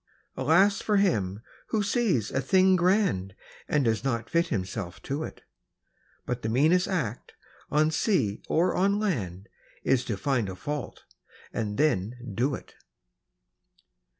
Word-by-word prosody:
Alas 175 +10 +3
for 210 -2 +1
him 105 - +1 0.2
who 215 -2 0
sees 200 - +1
a 135 - 0
thing 185 +6 +4
grand 175 - +1 0.3
And 145 -3 +1
does 110 -2 +1
not 115 -4 -2
fit 170 +1 +2
himself 95 - -4
to 140 +3 -3
it! - - -9 0.8
But 125 0 -3
the 110 - -2
meanest 155 +10 +3
act, 140 - -3 0.3
on 155 +1 +3
sea 140 - +1
or 170 +3 +2
on 200 +2 +2
land, 105 - -2 0.4
Is 130 -2 +2
to 105 - -2
find 120 -2 0
a 95 - -6
fault, 145 +7 -5 0.5
and 105 -3 -2
then 125 -6 +1 0.2
do 130 +6 +1
it! - - -12
135 Hz, 140 wpm, -27 LUFS, 110-180 Hz, 0.8 s, thing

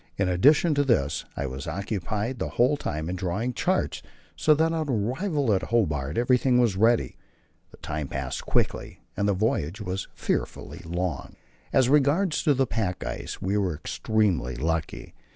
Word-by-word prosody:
In 100 - +1
addition 145 - +4
to 145 0 +2
this 115 - +1
I 70 - -1
was 65 +4 -6
occupied 105 +6 -3
the - - -2
whole 125 +5 +3
time 80 - -4
in 90 - -2
drawing 95 +7 -2
charts, - - 0 0.3
so 120 - +4
that 160 +2 +2
on 160 -3 -2
arrival 130 - 0
at 95 - +1
Hobart 75 - 0
everything 125 +1 +3
was 120 -6 +3
ready; 110 - +2 0.5
the - - -16
time 75 -1 -4
passed 70 -2 -4
quickly, - - -1
though 100 - 0
the 100 - +3
voyage 95 -2 -1
was 95 -2 -4
fearfully 85 - -3
long. 85 -3 -3 0.4
As 130 -2 +4
regards 150 +6 +3
the 135 -4 +3
pack 100 -5 -2
ice - - -5
we 100 +2 +1
were 90 -5 0
extremely 90 - 0
lucky. 80 +4 -3
105 Hz, 160 wpm, -26 LUFS, 85-130 Hz, 0.5 s, addition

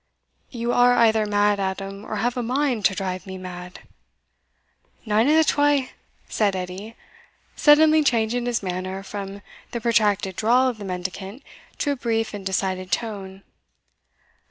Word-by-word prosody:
"You 240 -1 -2
are 245 0 +5
either 220 -2 +3
mad, 205 0 +2
Adam, 195 +1 -4
or - - -5
have 235 +4 -1
a 250 - -1
mind 250 -2 0
to 190 - +3
drive 185 -1 -4
me 190 0 -6
mad." 180 0 -9 1.2
"Nane 220 +4 +2
o' 305 - +5
the 320 - +6
twa," 290 -3 +2 0.4
said 205 -3 0
Edie, 185 +5 -6 0.6
suddenly 310 +1 +5
changing 240 -1 +1
his 235 -3 -1
manner 185 +1 -4
from 200 0 -7 0.3
the 235 - -4
protracted 205 -4 +1
drawl 245 +4 +3
of 240 -4 -3
the 205 - -7
mendicant 190 +6 -6 0.3
to 290 - 0
a - - 0
brief 225 -3 -1
and 205 -1 -6
decided 185 -1 -2
tone. 195 -2 -4
210 Hz, 150 wpm, -23 LUFS, 190-240 Hz, 1.2 s, the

